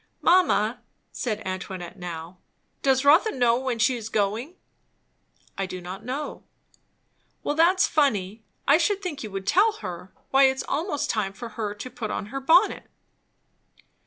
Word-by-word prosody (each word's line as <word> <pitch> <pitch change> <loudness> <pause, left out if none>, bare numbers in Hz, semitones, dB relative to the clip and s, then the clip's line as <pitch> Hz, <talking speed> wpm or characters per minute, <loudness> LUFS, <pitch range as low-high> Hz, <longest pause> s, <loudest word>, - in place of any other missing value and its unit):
"Mamma," 250 - +3 0.3
said 220 -3 -3
Antoinette 185 0 -6
now, 175 0 -7 0.4
"does 265 0 +2
Rotha 320 +10 +6
know 240 -2 +2
when 255 -2 -2
she 235 +3 +3
is 225 -2 -6
going?" 220 - -1 1.0
"I 195 - -1
do 185 0 -6
not 185 +4 -8
know." 265 +5 -5 1.0
"Well, - - 0
that's 345 +4 +4
funny. 220 -8 0 0.2
I 290 +3 +6
should 400 +3 0
think 305 -7 -4
you 215 - -5
would 195 -1 -5
tell 405 - +4
her. 180 - -8 0.2
Why 270 0 +6
it's 265 0 +1
almost 295 -1 -1
time 200 -3 -2
for 235 +3 -8
her 210 -2 -4
to 210 +5 -7
put 215 -3 -5
on - - -3
her 275 - -2
bonnet." 335 +9 +3
235 Hz, 155 wpm, -25 LUFS, 195-290 Hz, 1.0 s, Rotha